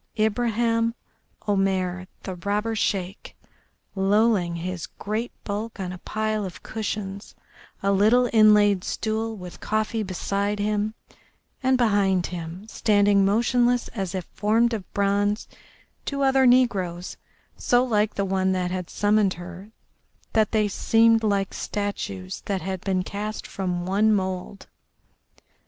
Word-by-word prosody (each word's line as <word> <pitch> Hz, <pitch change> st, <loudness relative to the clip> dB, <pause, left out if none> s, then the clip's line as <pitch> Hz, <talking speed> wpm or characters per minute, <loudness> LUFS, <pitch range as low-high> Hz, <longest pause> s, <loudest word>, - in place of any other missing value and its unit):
Ibraheim 230 Hz, +1 st, +1 dB, 0.5 s
Omair, 190 Hz, -2 st, 0 dB, 0.2 s
the 190 Hz, -, -4 dB
robber 205 Hz, +5 st, -2 dB
Sheik, 195 Hz, -2 st, -2 dB, 0.6 s
lolling 195 Hz, -2 st, +2 dB
his 175 Hz, 0 st, -4 dB
great 220 Hz, +4 st, -4 dB
bulk 215 Hz, +2 st, -4 dB
on 185 Hz, -2 st, -3 dB
a 180 Hz, -, -9 dB
pile 215 Hz, +2 st, -2 dB
of 185 Hz, -3 st, -7 dB
cushions, 205 Hz, -2 st, -5 dB, 0.5 s
a 200 Hz, -, +3 dB
little 220 Hz, +6 st, +4 dB
inlaid 210 Hz, -3 st, +5 dB
stool 220 Hz, 0 st, -2 dB
with 180 Hz, -2 st, -9 dB
coffee 215 Hz, +1 st, -1 dB
beside 200 Hz, +1 st, -2 dB
him, 210 Hz, +1 st, -1 dB, 0.7 s
and 260 Hz, -1 st, +3 dB
behind 200 Hz, -6 st, +2 dB
him, 175 Hz, +3 st, -7 dB
standing 205 Hz, -2 st, +3 dB
motionless 240 Hz, +4 st, +2 dB
as 195 Hz, -4 st, -4 dB
if 185 Hz, -3 st, -3 dB
formed 225 Hz, +4 st, +2 dB
of 205 Hz, -5 st, -5 dB
bronze, 205 Hz, +1 st, +1 dB, 0.6 s
two 280 Hz, -1 st, -2 dB
other 265 Hz, -1 st, +4 dB
negroes, 190 Hz, -9 st, +2 dB, 0.4 s
so 245 Hz, 0 st, +2 dB
like 215 Hz, -4 st, +1 dB
the 200 Hz, -, 0 dB
one 190 Hz, 0 st, +1 dB
that 180 Hz, -1 st, -1 dB
had 180 Hz, -2 st, -4 dB
summoned 205 Hz, -2 st, +2 dB
her 180 Hz, +3 st, -9 dB, 0.6 s
that 220 Hz, -2 st, +3 dB
they 215 Hz, -2 st, +2 dB
seemed 225 Hz, +3 st, +3 dB
like 200 Hz, -2 st, 0 dB
statues 100 Hz, -, -4 dB
that 195 Hz, -4 st, -2 dB
had 190 Hz, 0 st, -3 dB
been 185 Hz, -2 st, 0 dB
cast 210 Hz, +3 st, -5 dB
from 180 Hz, -2 st, -3 dB
one 205 Hz, +4 st, +3 dB
mould. 190 Hz, -1 st, -2 dB
205 Hz, 130 wpm, -24 LUFS, 190-220 Hz, 0.7 s, inlaid